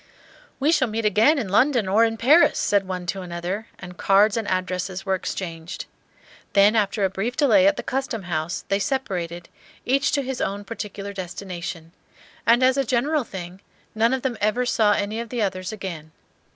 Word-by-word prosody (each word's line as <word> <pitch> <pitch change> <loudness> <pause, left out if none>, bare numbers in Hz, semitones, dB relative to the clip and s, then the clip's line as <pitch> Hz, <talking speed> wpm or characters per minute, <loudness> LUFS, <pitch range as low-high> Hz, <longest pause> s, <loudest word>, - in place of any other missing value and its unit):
"We 290 +3 +3
shall 270 -6 +3
meet 220 0 -3
again 220 +9 +4
in 225 -9 -2
London 240 +1 +3
or 215 +4 +4
in 225 0 -2
Paris," 290 +10 +5
said 200 -2 +1
one 180 -1 -4
to 190 +2 -3
another, 180 +4 -4
and 180 -1 -10
cards 200 +2 +4
and 225 -3 -2
addresses 185 0 -2
were 190 - +1
exchanged. 170 -2 -5 0.7
Then 205 +2 +5
after 205 -1 +1
a - - +1
brief 220 +6 -3
delay 285 0 +5
at 295 - +3
the - - -4
Custom 255 -6 -3
House 170 0 -3
they 195 - +1
separated, 180 -9 -3 0.4
each 275 +3 +2
to 280 - +1
his 265 -1 -4
own 200 +1 -2
particular 200 -2 -6
destination; 180 -3 -6 0.6
and, 235 +2 +5
as 260 +1 +4
a 275 - +2
general 270 +5 +1
thing, 185 -3 -8 0.3
none 225 +2 +2
of 265 -1 -1
them 255 -4 -2
ever 215 +4 +1
saw 215 -4 +3
any 205 +2 -2
of 235 -1 -5
the 240 -3 -1
others 185 -1 -3
again. 175 -7 -7
205 Hz, 185 wpm, -23 LUFS, 185-240 Hz, 0.7 s, Paris